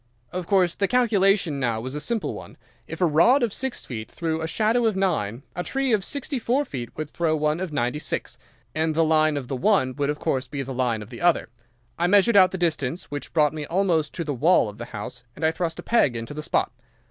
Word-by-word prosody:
"Of 180 -2 -4
course 185 -4 +3
the 200 - 0
calculation 195 - +2
now 120 -4 0
was 130 +3 -5
a 150 - -3
simple 220 +9 -2
one. - - -10 0.3
If - - -7
a - - +5
rod 175 - +4
of 225 -4 0
six 265 -1 -4
feet 110 -3 -6
threw 160 -1 -3
a 160 - -2
shadow 225 +6 +2
of 215 - 0
nine, 140 - -1
a 180 - -2
tree 270 +5 0
of 205 -3 +2
sixty 280 +2 -2
four 255 +5 +1
feet 120 - -6
would 155 -1 -5
throw 165 -2 0
one 155 +1 0
of 185 -3 -4
ninety 125 +1 -1
six, - - -4 0.3
and 155 +1 0
the 165 - +4
line 155 -1 +3
of 130 -3 -5
the 135 - -3
one 130 -5 +2
would 145 -1 0
of 150 - -1
course 130 -2 -1
be 140 -1 -4
the 135 0 -6
line 120 -4 -1
of 105 - -15
the 120 - -9
other. 175 -7 +2 0.5
I 175 - +2
measured 205 +4 +4
out 185 -2 +7
the 190 - -5
distance, 160 -3 -1
which 145 0 -5
brought 150 -1 +3
me 150 -2 -5
almost 170 -4 +1
to 170 - -2
the 150 -2 -3
wall 150 -2 +3
of 105 - -12
the 120 - -5
house, 125 0 -8
and 160 - -2
I 160 - +4
thrust 165 0 -3
a - - -7
peg 185 - +2
into 115 +5 -5
the 150 - -5
spot. - - 0
160 Hz, 245 wpm, -24 LUFS, 140-195 Hz, 0.5 s, out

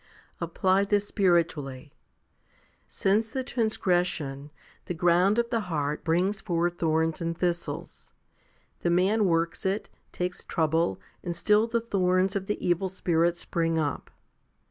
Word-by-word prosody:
Apply 190 0 +2
this 205 0 +1
spiritually. 155 -9 0 0.9
Since 210 +3 +1
the 260 +3 -3
transgression 175 - -1 0.4
the 175 - -4
ground 175 +5 +3
of 235 0 0
the 230 - +2
heart 150 -2 -2
brings 185 +5 +1
forth 175 -1 -1
thorns 160 0 +1
and 165 0 -2
thistles. 175 -1 -3 0.7
The 175 - 0
man 195 +5 +3
works 165 -1 0
it, 195 +3 -2 0.2
takes 180 0 -4
trouble, 160 - 0 0.2
and 175 -1 -3
still 210 +5 +3
the 235 0 0
thorns 185 -3 +1
of 195 -1 -2
the 210 - -1
evil 175 +2 +1
spirits 175 -2 +1
spring 165 -1 0
up. 150 -3 -2
175 Hz, 130 wpm, -27 LUFS, 165-200 Hz, 0.9 s, ground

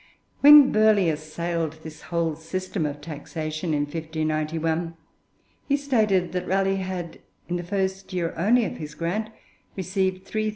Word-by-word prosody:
When 290 -1 +9
Burghley 215 -4 +4
assailed 160 +1 -3
this 160 -1 -10
whole 170 -2 0
system 175 +1 -3
of 145 0 -6
taxation 155 +1 -5
in 150 -1 +1
1591, 160 +1 -2 0.7
he 280 - +3
stated 215 -10 +1
that 180 0 -3
Raleigh 195 +1 +1
had, 185 -3 -5 0.3
in 175 - -1
the 175 - -5
first 190 +1 -2
year 175 -2 -2
only 225 +8 +3
of - - -5
his 150 -1 -8
grant, 200 +6 -2 0.5
received 190 0 -1
3,950_l. 215 +1 -1
175 Hz, 140 wpm, -25 LUFS, 160-195 Hz, 0.7 s, When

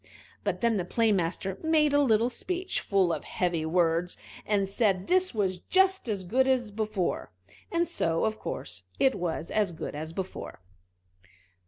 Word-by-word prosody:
But - - -2
then 230 -2 +2
the 185 - 0
Play 225 +5 +2
master 190 0 -1
made 310 -2 +3
a 290 - +5
little 235 -2 +3
speech, 365 +8 -2
full 190 -4 +2
of - - -4
heavy 170 -3 -1
words, 170 +1 +1 0.3
and 200 -2 +2
said 195 -2 +1
this 370 0 +2
was 190 -4 0
just 380 - +2
as 195 -3 -2
good 260 +8 +2
as 250 -5 +1
before 210 -3 -2 0.4
and 340 0 +1
so, 165 - 0
of 220 0 -1
course, 90 +1 -5 0.2
it 265 - +4
was 170 -3 -3
as 210 -4 +1
good 160 - -6
as 155 +2 -5
before. 190 +2 -6
205 Hz, 165 wpm, -28 LUFS, 180-255 Hz, 0.4 s, a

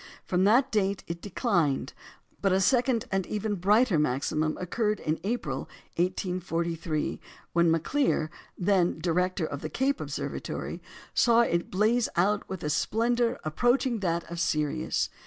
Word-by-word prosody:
From 185 +1 +2
that 255 +6 +4
date 200 -2 0
it 170 0 -6
declined; 175 - 0 0.5
but 195 - +2
a 190 - +3
second 245 +2 +2
and 195 -1 +1
even 210 0 -2
brighter 205 0 +3
maximum 150 +2 0
occurred 210 +3 -1
in 155 0 -1
April, 235 +5 -3 0.3
1843, 170 -3 -1 0.3
when 170 0 +4
Maclear, 165 - +1 0.3
then 180 -2 +2
director 180 +1 0
of 145 -2 -5
the 155 - -4
Cape 270 - 0
Observatory, - - -4 0.3
saw 235 -1 +5
it 170 -7 0
blaze 220 +5 +2
out 200 +4 +1
with 190 -3 -5
a 150 - -1
splendour 235 +6 +1
approaching 240 - +1
that 170 -3 0
of 170 0 -7
Sirius. 150 -3 0
185 Hz, 140 wpm, -28 LUFS, 165-225 Hz, 0.5 s, saw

